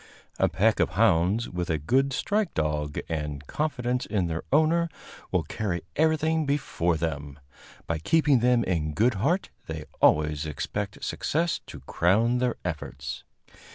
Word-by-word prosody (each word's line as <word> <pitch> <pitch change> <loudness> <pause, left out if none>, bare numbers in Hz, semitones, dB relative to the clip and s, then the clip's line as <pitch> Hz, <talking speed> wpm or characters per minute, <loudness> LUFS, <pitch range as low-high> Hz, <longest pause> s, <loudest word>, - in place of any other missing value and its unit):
A - - +4
pack 100 +5 +2
of - - +3
hounds, 100 +1 +3
with 90 -1 -4
a 80 - +1
good 130 - +1
strike 205 +7 0
dog 75 -1 -1
and 75 -2 -4
confidence 125 - -1
in 100 -5 0
their 80 -1 -2
owner, 160 +3 +3 0.4
will - - +1
carry 90 -6 -3
everything 160 0 +2
before 90 - 0
them; 75 -3 -4 0.5
by 85 -1 -2
keeping 145 - +3
them 120 0 +3
in 75 -4 -1
good 120 +4 +3
heart 175 - +1 0.2
they 80 -1 -5 0.2
always 75 0 +3
expect 100 +7 -4
success 165 +2 0
to - - -9
crown 115 +8 +2
their 125 -1 +1
efforts. 70 -5 -5
100 Hz, 145 wpm, -27 LUFS, -, 0.5 s, A